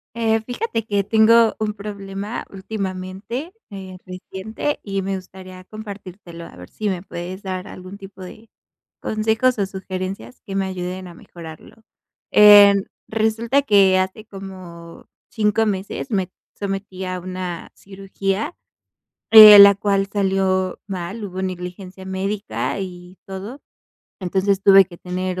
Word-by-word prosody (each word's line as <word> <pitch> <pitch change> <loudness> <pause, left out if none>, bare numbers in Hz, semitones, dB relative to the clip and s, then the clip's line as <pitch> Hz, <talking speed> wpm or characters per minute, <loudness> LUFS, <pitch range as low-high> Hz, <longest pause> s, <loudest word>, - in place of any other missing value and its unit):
Eh, 225 -1 +1
fíjate 245 - -3
que 205 -2 0
tengo 225 +2 +4
un 215 -1 -2
problema 200 +1 -6
últimamente, 195 - -6 0.2
eh, 190 -2 -9
reciente, 190 +9 -5
y 195 -1 -3
me 195 0 -2
gustaría 185 0 -11
compartírtelo, 195 -5 -10
a - - -15
ver 90 0 -12
si 215 - -3
me 185 -3 -3
puedes 185 +1 -7
dar 185 0 -5
algún 185 +1 -10
tipo 195 -1 -12
de 215 +5 -12 0.5
consejos 220 +3 0
o 200 - 0
sugerencias 190 +3 -7
que 195 - -6
me 195 -1 0
ayuden 185 0 -5
a 175 - -12
mejorarlo. 165 -2 -12 0.6
Em, 205 -1 +8 0.2
resulta 225 +5 +1
que 195 -7 +4
hace 190 +3 -3
como 185 -4 -11 0.2
5 220 0 +1
meses 200 +5 -4
me 190 -4 -1 0.3
sometí 195 -1 -5
a 185 0 -4
una 180 -1 -6
cirugía, 195 - -4 0.8
eh, 215 -2 +12
la 200 0 +9
cual 195 0 0
salió 190 -2 0
mal, 195 +3 -5
hubo 190 -1 -6
negligencia 185 +1 -7
médica 195 +2 -3
y 180 -1 -8
todo. 200 +8 -8 0.6
Entonces, 190 +1 0
tuve 195 -1 +7
que 175 - -13
tener 185 0 -4
195 Hz, 130 wpm, -21 LUFS, 185-210 Hz, 0.8 s, eh